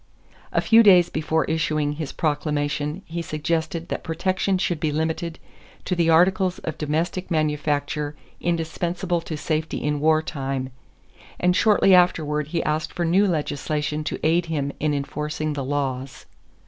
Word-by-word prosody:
A - - +2
few 225 0 +6
days 185 -5 +6
before 160 +1 0
issuing 155 -2 0
his 150 -1 -5
proclamation 150 +2 -1
he 170 +1 -4
suggested 165 +1 -2
that - - -3
protection 185 +3 0
should 175 -3 -1
be 155 -1 0
limited 160 +2 -2 0.5
to 180 - 0
the 170 -1 +2
articles 185 +3 +3
of 155 -1 -6
domestic 165 +5 -2
manufacture 150 -2 -1 0.2
indispensable 170 +1 -1
to 160 -2 -5
safety 155 +1 -2
in 150 0 0
war 155 +1 +3
time, 135 -4 -3 0.7
and 180 0 +3
shortly 205 -2 +4
afterward 150 -5 +3
he 170 +2 -1
asked 155 +1 -1
for 175 - -2
new 190 +5 +4
legislation 150 -2 -2
to - - -2
aid 170 +2 +2
him 145 -3 -1
in 150 -1 +1
enforcing 150 +2 -3
the 140 -2 -3
laws. 135 -1 -3
155 Hz, 145 wpm, -23 LUFS, 150-170 Hz, 0.7 s, few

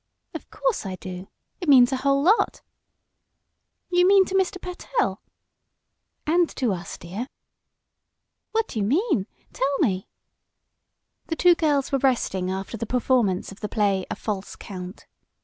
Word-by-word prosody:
"Of - - -8
course - - -1
I 190 -2 -4
do. 185 0 -8 0.3
It 350 -5 -3
means 250 -3 +7
a 265 - 0
whole 275 +1 +2
lot." 410 +8 +2 1.3
"You 355 0 +4
mean 390 0 +6
to 375 - -7
Mr. 380 0 +1
Pertell?" 365 +7 -2 1.0
"And 340 +2 +3
to 245 -6 +1
us, 175 -2 -6
dear." 195 +9 -6 1.2
"What 450 0 +1
do 220 - -4
you 200 - +1
mean? 300 - +1 0.3
Tell 275 +1 0
me." 195 - 0 1.2
The 325 - -2
two 355 +2 +6
girls 295 -5 +1
were 275 - +2
resting 230 -8 +1
after 190 +4 -4
the 230 - -4
performance 240 -7 +1
of 195 - -12
the 210 - -4
play 200 -3 +1
"A - - -3
False 205 -3 -4
Count." 185 0 -9
255 Hz, 150 wpm, -24 LUFS, -, 1.3 s, means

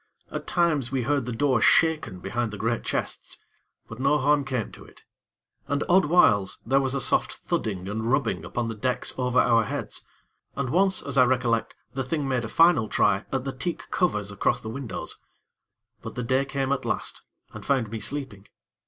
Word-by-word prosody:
At - - -5
times 155 -8 +1
we 130 -2 0
heard 140 -1 0
the - - -2
door 130 0 +1
shaken 140 - +3
behind 120 +3 -2
the 105 - -7
great 115 +2 -1
chests; - - -3 0.5
but 115 - -10
no 140 +3 +3
harm 145 +1 +2
came 130 -5 -3
to - - -13
it. - - -18 0.6
And, 145 0 0
odd 185 -1 +5
whiles, 115 - +4
there 135 +4 +3
was 135 0 -1
a - - 0
soft - - +3
thudding 95 -4 -3
and 110 +3 -3
rubbing 115 - 0
upon 115 +7 -3
the 115 - -3
decks 125 +4 -1
over 125 -1 -1
our 115 -2 +4
heads, - - -4 0.5
and 140 -2 -2
once, 190 +2 +3
as 140 -1 0
I 125 - +7
recollect, 120 -2 0 0.2
the 135 - -2
Thing 140 +2 -2
made 130 -3 0
a - - -6
final 165 -10 +4
try 100 0 +2
at 135 -1 -1
the 135 0 -4
teak 170 +7 -5
covers 105 - 0
across 100 - +1
the 110 - -7
windows; 130 -1 -4 0.8
but - - -8
the 125 - -3
day 130 +3 +1
came 135 -1 -2
at 140 - 0
last, - - -3 0.3
and - - -9
found 125 -6 0
me 115 - -4
sleeping. 130 -7 -3
130 Hz, 195 wpm, -26 LUFS, 115-140 Hz, 0.8 s, I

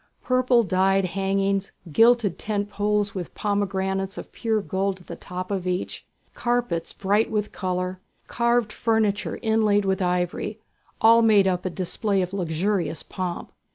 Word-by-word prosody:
Purple 255 -2 +3
dyed 190 0 +2
hangings, 195 +1 0 0.2
gilded 225 +1 +4
tent 205 -1 -2
poles 205 0 0
with 180 -4 -6
pomegranates 195 -2 -1
of - - -8
pure 225 -2 0
gold 195 -1 -2
at - - -18
the - - -7
top 185 +2 -6
of 190 -2 -2
each, 180 0 -3 0.3
carpets 240 -9 -1
bright 205 +3 +1
with 210 -1 -1
colour, 185 -1 -3 0.3
carved 235 -2 +1
furniture 220 -3 0
inlaid 215 -2 +2
with 190 0 0
ivory, 180 +4 -1 0.4
all 230 +1 +7
made 215 -3 +5
up 180 -1 0
a - - +1
display 190 +2 -1
of 180 +1 -6
luxurious 175 -1 -1
pomp. 180 -2 -5
195 Hz, 145 wpm, -24 LUFS, 185-215 Hz, 0.4 s, all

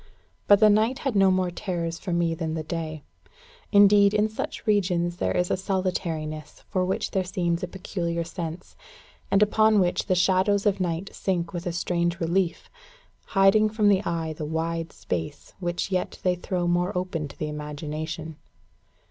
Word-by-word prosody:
But 205 -1 +7
the 215 - +7
night 220 +5 +2
had 265 -5 0
no 195 -1 +5
more 185 -1 +1
terrors 170 -2 -3
for 185 - -5
me 170 -1 +1
than 160 -1 -3
the 160 - -3
day. 155 -2 -5 0.7
Indeed, 205 0 +6
in 210 +1 +2
such 220 - -5
regions 180 -5 +1
there - - 0
is 180 0 0
a - - +3
solitariness 175 -5 -3
for 185 - +1
which 185 +1 -2
there 190 - +1
seems 175 -2 -1
a 180 - -2
peculiar 170 -2 -3
sense, 170 0 -7 0.5
and 195 +1 +4
upon 215 0 +4
which 180 -2 +1
the 185 - +2
shadows 190 +3 +2
of 200 -2 +2
night 180 +1 -2
sink 175 -3 -2
with 175 0 -4
a - - 0
strange 170 0 -1
relief, 170 +1 0 0.7
hiding 195 +3 +5
from 210 -1 +2
the 195 0 +3
eye 165 -3 -2
the 155 - -7
wide 165 +1 -2
space 85 -2 -5
which 175 +2 -2
yet 185 -1 -1
they 180 - +3
throw 180 0 -2
more 175 +2 +1
open 180 -4 -2
to 140 - -14
the 155 - -3
imagination. 150 +1 -5
180 Hz, 175 wpm, -25 LUFS, 165-195 Hz, 0.7 s, But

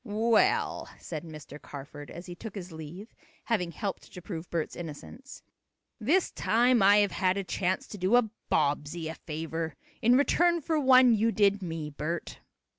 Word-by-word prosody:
"Well," 225 0 +1
said 160 -2 -6
Mr. 150 -3 -10
Carford, 145 +1 -9
as 175 - -9
he 175 - -7
took 215 +4 -9
his 185 -3 -7
leave, 160 +7 -9 0.3
having 200 -7 0
helped 200 +2 -5
to - - -9
prove 175 -2 -7
Bert's 165 -2 -2
innocence 175 - -9 0.6
"this 315 - +2
time 240 +1 +3
I 200 +1 +7
have 205 -1 +3
had 185 0 +1
a 200 - -1
chance 185 0 -1
to 205 - -8
do 185 +6 +3
a 245 -2 +4 0.2
Bobbsey 150 +3 0
a - - -4
favor, 160 0 -5 0.3
in 240 +2 +5
return 340 +4 +3
for 320 0 0
one 255 -3 +6
you 225 +1 +2
did 205 -2 +3
me, 160 -4 -4
Bert." 155 +4 -4
185 Hz, 170 wpm, -29 LUFS, 160-230 Hz, 0.6 s, I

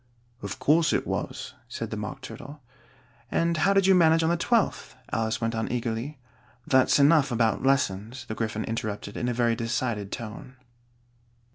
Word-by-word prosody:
"Of 100 -1 -5
course 160 +2 +3
it - - 0
was," - - -4 0.2
said - - -5
the - - -2
Mock - - -6
Turtle. 145 +1 -9 0.7
"And 170 0 +1
how 175 +5 +3
did 195 -1 +4
you 190 - +6
manage 165 -2 +5
on 160 - +2
the - - +2
twelfth?" 225 +6 0 0.2
Alice 115 0 0
went 115 0 -1
on 110 0 -2
eagerly. 120 +4 -3 0.5
"That's 130 -1 +4
enough 145 -1 +5
about 115 -2 +1
lessons," 120 -2 0
the 110 - -5
Gryphon 110 -1 -2
interrupted 105 -2 -4
in 120 - -1
a - - 0
very 120 -1 +2
decided 115 -3 -2
tone. 115 +3 -7
120 Hz, 165 wpm, -26 LUFS, 110-155 Hz, 0.7 s, you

